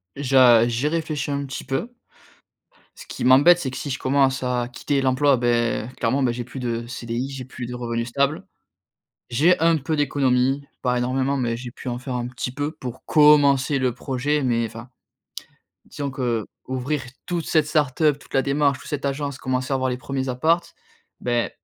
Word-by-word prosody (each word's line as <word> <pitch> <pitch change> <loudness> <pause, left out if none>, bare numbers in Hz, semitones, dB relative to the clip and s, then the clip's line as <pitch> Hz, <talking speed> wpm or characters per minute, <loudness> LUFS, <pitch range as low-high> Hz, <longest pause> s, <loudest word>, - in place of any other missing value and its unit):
Je 130 -4 +5
j'y 120 +5 -1
réfléchis 155 -3 -2
un 140 0 -2
petit 135 0 -6
peu. 175 - -3 1.0
Ce - - -11
qui - - -6
m'embête, 145 +8 +6
c'est 130 -6 -3
que - - -7
si 145 - -5
je 130 - -3
commence 130 -1 +2
à 125 -1 -1
quitter 135 +3 -2
l'emploi, 135 +1 +3
beh, 120 -1 0
clairement, 130 +4 +1
bah, 120 - +2
j'ai 120 0 -4
plus 130 +2 -9
de 120 -1 -3
CDI, 120 +1 -4
j'ai 135 -2 -7
plus 130 -1 -7
de 125 - -6
revenus 115 -1 -3
stables. 140 +4 0 0.8
J'ai 155 +10 +3
un 165 0 +4
peu 155 +3 -2
d'économie, 135 -1 +1
pas 125 -1 +1
énormément 130 +3 0
mais 120 -2 -1
j'ai 120 -1 -7
pu 130 - -11
en 120 0 -2
faire 130 0 -6
un 120 0 -2
petit 125 0 -5
peu 145 +3 -3
pour 125 -6 -8
commencer 145 -2 +5
le 125 -2 +1
projet 140 +3 -1
mais 115 -2 +1
enfin, 115 +3 -9 1.0
disons 140 -2 -5
qu'ouvrir 130 +3 -3 0.2
toute 175 -2 -2
cette 155 -2 +2
start-up, 150 -1 +1
toute - - -18
la 135 - +3
démarche, 140 -1 +1
toute - - -12
cette 145 -1 -4
agence, 140 0 -2
commencer 130 +1 -2
à - - +3
avoir 130 -1 0
les 125 - -3
1ers 135 0 -3
apparts, 160 +7 +2 0.6
beh, 120 -1 0
130 Hz, 185 wpm, -23 LUFS, 125-145 Hz, 1.0 s, m'embête